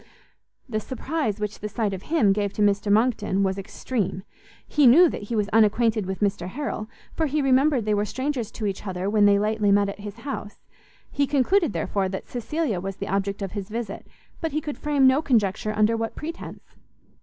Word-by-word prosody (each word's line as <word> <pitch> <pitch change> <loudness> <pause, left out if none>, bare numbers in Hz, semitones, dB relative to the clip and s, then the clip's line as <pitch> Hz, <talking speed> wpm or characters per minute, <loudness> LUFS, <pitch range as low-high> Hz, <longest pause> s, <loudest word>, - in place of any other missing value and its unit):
The 215 -4 -2
surprise 260 -1 -3
which 210 0 -4
the 210 - -5
sight 210 -1 -1
of 190 - -5
him 230 -10 +2
gave 205 -1 -1
to 210 - 0
Mr 205 0 +2
Monckton 210 -3 +2
was 190 0 0
extreme; 195 -1 -3 0.4
he 295 -3 +4
knew 330 +9 +8
that - - -4
he 235 - -1
was 210 -2 +1
unacquainted 220 -1 +3
with 190 +1 -4
Mr 195 -4 0
Harrel, 220 -1 -4 0.2
for 320 - 0
he 300 +2 0
remembered 270 -2 +3
they 215 - +1
were 205 0 +1
strangers 260 0 -3
to 220 - -4
each 200 +1 -3
other 185 0 -3
when 210 -1 +4
they 200 0 +5
lately 210 0 +1
met 200 0 +3
at 200 - -7
his 205 0 -7
house; 250 -7 -6 0.5
he 280 0 +1
concluded, 290 - +2
therefore, 195 -2 -1
that 190 - -6
Cecilia 245 - -2
was 195 +1 -5
the 200 - -6
object 195 +1 -1
of 195 - -4
his 200 -1 -5
visit, 220 -2 -5 0.3
but 325 -4 -3
he 305 - +1
could 295 -1 -6
frame 290 -3 +2
no 260 +3 +5
conjecture 215 -7 +1
under 215 +2 +3
what 225 0 -3
pretence. 325 +2 -7
215 Hz, 200 wpm, -24 LUFS, 200-265 Hz, 0.5 s, knew